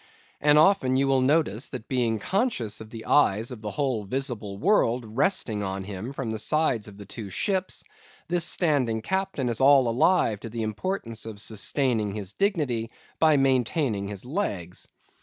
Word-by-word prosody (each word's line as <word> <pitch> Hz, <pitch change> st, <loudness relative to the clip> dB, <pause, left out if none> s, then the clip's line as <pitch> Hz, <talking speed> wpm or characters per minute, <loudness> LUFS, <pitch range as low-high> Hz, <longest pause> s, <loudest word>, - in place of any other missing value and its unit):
And 150 Hz, 0 st, +4 dB
often 155 Hz, -6 st, +4 dB
you 135 Hz, +1 st, +2 dB
will 135 Hz, -1 st, +3 dB
notice 135 Hz, -4 st, +1 dB
that 125 Hz, -4 st, -7 dB
being 120 Hz, -4 st, 0 dB
conscious 120 Hz, -, -1 dB
of 110 Hz, -, -10 dB
the 115 Hz, -1 st, -9 dB
eyes 115 Hz, -5 st, +3 dB
of 120 Hz, -4 st, -8 dB
the 105 Hz, -, -4 dB
whole 125 Hz, -1 st, -1 dB
visible 110 Hz, -3 st, -3 dB
world 125 Hz, -, +2 dB
resting 115 Hz, -, 0 dB
on 95 Hz, -1 st, -3 dB
him 100 Hz, +5 st, -6 dB
from 135 Hz, -5 st, -4 dB
the 110 Hz, -, -3 dB
sides 130 Hz, -7 st, +1 dB
of 100 Hz, -1 st, -12 dB
the 100 Hz, -, -10 dB
two 100 Hz, +1 st, -8 dB
ships, 190 Hz, -, -1 dB, 0.4 s
this 175 Hz, 0 st, +3 dB
standing 140 Hz, -10 st, +2 dB
captain 190 Hz, -7 st, -1 dB
is 120 Hz, +1 st, -1 dB
all 135 Hz, -2 st, +6 dB
alive 115 Hz, -, +2 dB
to 115 Hz, -, -8 dB
the 115 Hz, 0 st, -4 dB
importance 115 Hz, -, -3 dB
of 110 Hz, -2 st, -8 dB
sustaining 110 Hz, 0 st, 0 dB
his 105 Hz, -2 st, -5 dB
dignity 145 Hz, -, 0 dB, 0.3 s
by 155 Hz, -2 st, +5 dB
maintaining 130 Hz, -5 st, +1 dB
his 100 Hz, +1 st, -7 dB
legs. 100 Hz, -, -3 dB
120 Hz, 170 wpm, -26 LUFS, 110-145 Hz, 0.4 s, all